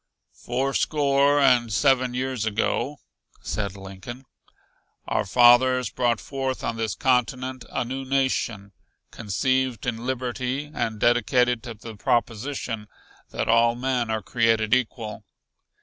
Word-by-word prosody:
"Fourscore 140 +2 +1
and 125 -4 +4
seven 130 +2 +2
years 130 -2 -2
ago," 110 +6 -1 0.4
said 100 -2 -3
Lincoln, 95 +7 -9 0.8
"our - - -1
fathers 125 +3 +5
brought 120 -3 +1
forth 135 -2 -4
on 115 - -2
this 110 -4 -2
continent 130 +1 0
a - - -2
new 135 +2 -4
nation, 130 -7 -1 0.4
conceived 125 +3 -1
in 120 -2 -3
liberty, 130 +2 -3
and 115 -3 -2
dedicated 120 +1 +2
to 115 0 -8
the 110 +1 -10
proposition 115 +1 -2 0.4
that - - -3
all 115 +1 +4
men 125 -2 -1
are 110 -2 -2
created 115 0 +1
equal. 115 -4 -1
120 Hz, 120 wpm, -24 LUFS, 115-130 Hz, 0.8 s, fathers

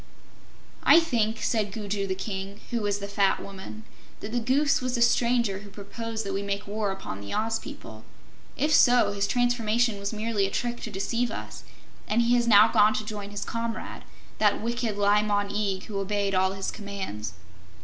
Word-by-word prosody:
"I - - +7
think," 230 -9 0
said 215 -3 0
Gugu 205 -1 -3
the 190 - -1
King, 195 0 -5
who 235 -1 0
was 205 -1 0
the 200 0 -6
fat 200 -1 +2
Woman, 200 +2 -9 0.4
"that 205 - -6
the 240 - 0
Goose 270 +5 +2
was 255 0 -1
the 235 - -1
stranger 235 -4 +2
who 205 0 -12
proposed 220 +2 -6
that 195 - -3
we 195 - -1
make 200 0 -3
war 205 0 -2
upon 190 - -6
the 100 - -5
Oz 225 +1 0
people. - - -10 0.5
If 300 +1 +1
so, 245 -6 +5
his 200 0 -1
transformation 240 -3 +1
was 200 0 -3
merely 215 -2 0
a - - -5
trick 240 +3 -3
to - - -5
deceive 230 +5 -1
us, 105 - -7 0.5
and 225 +3 +2
he 235 +1 +3
has 240 -1 +2
now 215 0 +7
gone 215 -1 +5
to 215 - -2
join 205 -1 -6
his 205 0 -5
comrade, 230 -1 -4 0.4
that 210 -1 +3
wicked 230 -1 -2
Li 205 +1 +4
Mon 205 -1 0
Eag 200 -2 -1
who 200 -2 -4
obeyed 200 0 -1
all 190 0 +2
his 195 0 -3
commands." 190 - -6
210 Hz, 190 wpm, -27 LUFS, 200-230 Hz, 0.5 s, I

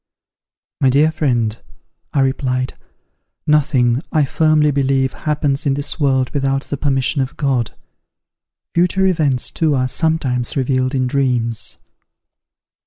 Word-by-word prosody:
"My 135 - +4
dear 145 +4 +4
friend," 120 -8 0 0.6
I 140 - +1
replied, 130 -1 -1 0.7
"nothing, 135 -5 +2
I 155 -3 +3
firmly 155 +1 +2
believe, 135 -1 +1
happens 150 -1 -1
in 135 - +2
this 145 +3 -4
world 130 -3 +1
without 135 -1 0
the - - -4
permission 135 0 0
of 130 0 -4
God. 130 -6 -1 1.0
Future 180 +3 +2
events, 150 -9 +1
too, 155 -3 +1
are 130 -1 +1
sometimes 135 -5 -1
revealed 130 0 0
in 130 -1 +1
dreams." 125 -4 -1
135 Hz, 120 wpm, -18 LUFS, 130-150 Hz, 1.0 s, My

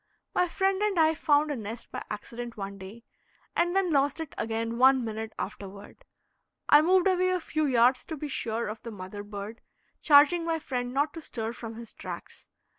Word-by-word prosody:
My 360 - +2
friend 385 +2 0
and 420 -3 +1
I 320 -1 +5
found 300 -1 +2
a - - -1
nest 225 0 -6
by - - -5
accident 235 +3 -6
one 200 0 -6
day, 200 +5 -10 0.5
and 350 +1 +1
then 385 -3 +2
lost 285 +1 +2
it 320 -3 -6
again 230 +1 -2
one 260 -1 +5
minute 220 0 -4
afterward. 200 - -8 0.6
I 295 - +8
moved 365 +3 +4
away 370 -1 +3
a 365 0 +1
few 310 -2 -1
yards 250 0 +4
to 320 - -6
be 300 - -4
sure 230 -4 -2
of 215 +1 -6
the 235 - -7
mother 205 -1 -7
bird, 205 +2 -8 0.4
charging 300 +3 +6
my 330 -1 0
friend 250 -5 -3
not 285 +3 0
to 330 - -7
stir 225 -5 -4
from 230 -2 -8
his 230 -1 -10
tracks. - - -9
255 Hz, 190 wpm, -28 LUFS, 225-320 Hz, 0.6 s, I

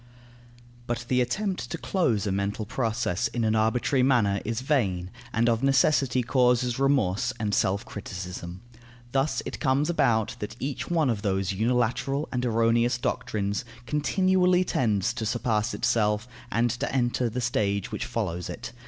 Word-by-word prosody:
But 120 0 -3
the 125 -1 +3
attempt 185 - -2
to 170 - -3
close 125 - 0
a 100 - 0
mental 100 +2 -2
process 110 -2 -1
in 115 +1 -2
an 110 0 +2
arbitrary 120 +5 +2
manner 115 -7 +3
is 115 +2 -2
vain, 95 -11 0 0.2
and 115 +1 +1
of 115 -1 +2
necessity 135 -1 +3
causes 125 -1 +2
remorse 135 -9 +2
and 105 -1 -1
self 100 0 +1
criticism. 90 -2 -7 0.5
Thus 135 +3 0
it - - -5
comes 145 +3 +2
about, 120 -9 +1
that 105 +2 -5
each 135 0 -4
one 160 -6 +2
of 105 -3 -3
those 95 -2 0
unilateral 125 +7 0
and 125 -1 -1
erroneous 115 +1 +2
doctrines 100 -4 -2 0.2
continually 180 +5 +2
tends 110 - 0
to 120 -2 -4
surpass 110 -1 0
itself 105 0 +1 0.2
and 120 +1 +2
to 120 - -3
enter 120 -1 +1
the 120 +3 -4
stage 105 -6 0
which - - -3
follows 90 -6 -3
it. - - -6
120 Hz, 155 wpm, -26 LUFS, 105-130 Hz, 0.5 s, the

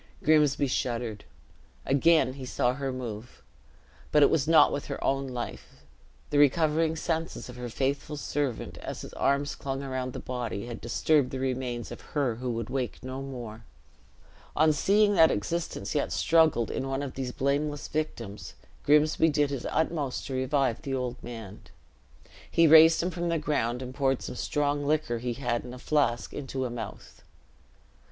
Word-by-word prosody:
Grimsby 150 -2 +4
shuddered. 120 -4 -2 0.6
Again 140 -1 +4
he 135 -1 -9
saw 125 -1 0
her 135 0 -3
move; 120 -3 -7 0.7
but 150 - +6
it - - +5
was 150 -3 +1
not 165 0 +6
with 145 - -4
her - - -5
own 135 0 0
life; 125 -2 -7 0.5
the 145 - +3
recovering 155 +2 +3
senses 160 -3 -3
of 125 - -9
her 125 -1 -6
faithful 140 +4 -2
servant, 140 -4 -3
as - - -6
his - - -9
arms 140 +1 +1
clung 135 0 -4
around 130 -2 -3
the - - -5
body, 120 -4 -4
had 120 -1 -7
disturbed 140 +4 +2
the 135 - -5
remains 125 -2 -3
of - - -8
her 135 -7 -1
who 125 +1 -4
would 115 -2 -3
wake 130 -1 -3
no 130 +1 -5
more. 120 -5 -7 0.9
On 155 0 +4
seeing 205 +7 +3
that 165 -4 +6
existence 165 +12 -3
yet 145 - 0
struggled 160 -8 +3
in 135 - -3
one 135 +1 -2
of 135 - -5
these 130 -2 -4
blameless 145 +3 -1
victims, 115 -9 -4 0.3
Grimsby 150 +2 +4
did 145 -1 +1
his 135 -3 -3
utmost 155 -5 -1
to 135 - -5
revive 130 -2 0
the 135 -3 -3
old 125 -1 -3
man. 115 -4 -8 0.9
He 165 - +4
raised 160 +1 +7
him 180 - -1
from 175 -1 -2
the 170 - +1
ground, 130 -5 -1
and 130 0 -7
poured 135 -2 0
some - - -5
strong 145 +3 -1
liquor 145 -5 0
he 120 +1 -2
had 120 -2 -2
in 125 0 -8
a - - -10
flask 125 -4 0
into 135 -2 -4
a 125 - -3
mouth. 115 -3 -8
135 Hz, 170 wpm, -28 LUFS, 125-150 Hz, 0.9 s, raised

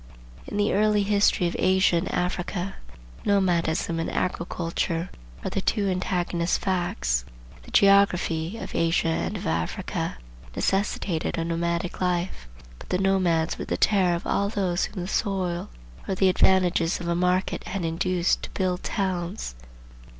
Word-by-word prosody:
In - - -4
the 205 0 +2
early 210 0 +3
history 200 -2 +3
of 170 - -3
Asia 190 -2 +4
and 170 - -2
Africa, 180 +1 -2 0.5
Nomadism 170 -4 +1
and 165 - -2
Agriculture 170 -1 -2 0.3
are - - -2
the 195 - -1
two 205 0 +1
antagonist 180 -2 0
facts. 175 - 0 0.4
The - - -14
geography 195 -2 +3
of - - -7
Asia 165 0 +2
and 190 +5 -1
of - - -7
Africa 80 0 -2 0.4
necessitated 195 -4 0
a 165 - -1
nomadic 170 +1 -2
life. 180 - -1 0.3
But - - -13
the 180 - +1
nomads 180 -4 +1
were - - -3
the - - -2
terror 185 -4 +3
of 170 - -6
all 200 0 +1
those 190 -4 0
whom 180 - -6
the - - -5
soil 185 - -1 0.4
or 190 - -1
the 190 0 +4
advantages 180 -2 +3
of 175 - -5
a 170 - +1
market 180 +2 0
had 190 -3 -3
induced 175 +2 +1
to - - -6
build 185 -1 0
towns. 185 - -2
180 Hz, 150 wpm, -25 LUFS, 170-195 Hz, 0.5 s, Asia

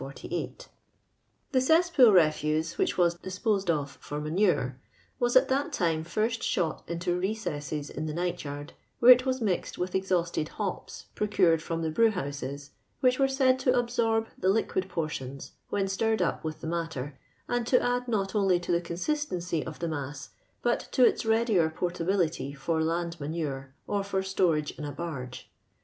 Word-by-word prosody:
^ 135 +1 -6 0.8
The 260 -3 +3
cesspool 320 -4 +5
refuse, 155 -2 +2
which - - +1
was 175 -1 +4
disposed 190 +2 -2
of 145 -4 -1
for 145 - -5
manure, 150 -5 +1 0.4
was 245 -1 +1
at 255 - +6
that 275 +2 0
time 165 -3 +1
first 215 +7 -1
shot 165 -4 0
into 175 +1 -1
recesses 155 -8 -3
in 155 +2 -4
the 155 - -3
night 175 +1 -2
yard, 145 0 -7 0.2
where 245 +1 +8
it 255 +1 +6
was 260 -1 0
mixed 195 -5 -1
with 180 +1 -3
exhausted 175 -4 0
hops 200 -3 -4
procured 185 -6 +2
from 165 0 -3
the 160 - -1
brew 230 +8 +4
houses, 140 -5 -5 0.3
which 255 0 +3
were 270 - +4
said 265 -1 +3
to 255 -1 +2
absorb 235 -2 +1
the 185 - +2
liquid 190 -2 0
portions, 140 -5 -4 0.2
when 195 -1 0
stirred 220 +3 0
up 180 - 0
with 155 -1 -5
the - - -5
matter, 160 -5 -4 0.3
and 245 -1 -1
to 250 - +5
add 245 0 0
not 200 -5 -1
only 195 -4 +3
to 175 - -4
the 170 0 +2
consistency 175 - -2
of 160 - -7
the 170 - -3
mass, 145 -2 -5 0.3
but 240 0 +2
to 255 - +5
its 230 - +2
readier 220 -7 +3
portability 170 -3 -1
for 160 +3 -1
land 170 +1 -2
manure 140 -3 -4
or 200 -1 -1
for 195 -1 -1
stowage 170 -6 +1
in - - -5
a 145 - -4
barge. 140 -5 -6
175 Hz, 170 wpm, -28 LUFS, 155-220 Hz, 0.8 s, where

